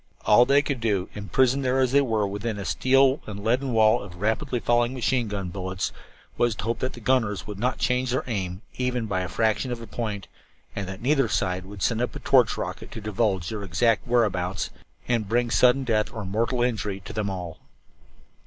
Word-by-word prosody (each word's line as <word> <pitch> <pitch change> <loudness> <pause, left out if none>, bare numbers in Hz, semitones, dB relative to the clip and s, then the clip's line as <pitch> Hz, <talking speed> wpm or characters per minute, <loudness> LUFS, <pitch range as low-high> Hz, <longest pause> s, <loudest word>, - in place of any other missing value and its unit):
All 120 +3 +6
that - - 0
they 145 - +7
could 140 -4 -2
do, 100 -5 0
imprisoned 125 +7 +1
there 130 +1 +1
as 130 -2 +2
they 140 +1 +5
were 110 -6 0
within 105 +2 -3
a 100 - -5
steel 135 +4 +3
and 100 -1 -6
leaden 125 +4 +1
wall 110 -2 +4
of 95 -3 -10
rapidly 115 +5 0
falling 120 +2 +1
machine 125 -1 0
gun 100 -3 -4
bullets, 95 0 -3 0.5
was 120 -2 +2
to 95 - -6
hope 115 +1 -1
that 130 - -2
the - - -10
gunners 110 -4 +1
would 105 -2 -7
not 125 +3 0
change 125 0 0
their 130 +2 0
aim, 95 -4 -4 0.2
even 125 -2 0
by 95 -3 -1
the 90 - -4
fraction 110 +6 0
of 120 - -3
a 115 - -8
point, 105 -3 -4 0.5
and 100 -2 -3
that 95 +3 -7
neither 135 -1 +3
side 95 -3 -1
would 100 -2 -7
send 115 +2 +1
up 125 - -2
a - - -5
torch 125 -7 +3
rocket - - -5
to - - -6
divulge 105 -5 -1
their 110 -2 -4
exact 100 +6 +1
whereabouts 95 -7 0 0.4
and 115 -5 0
bring 120 +1 +1
sudden 125 +2 +4
death 110 -4 0
or 110 -3 -6
mortal 115 +5 0
injury 105 -5 -1
to - - -9
them 105 -2 -1
all. 90 -4 -6
110 Hz, 210 wpm, -25 LUFS, 100-125 Hz, 0.5 s, they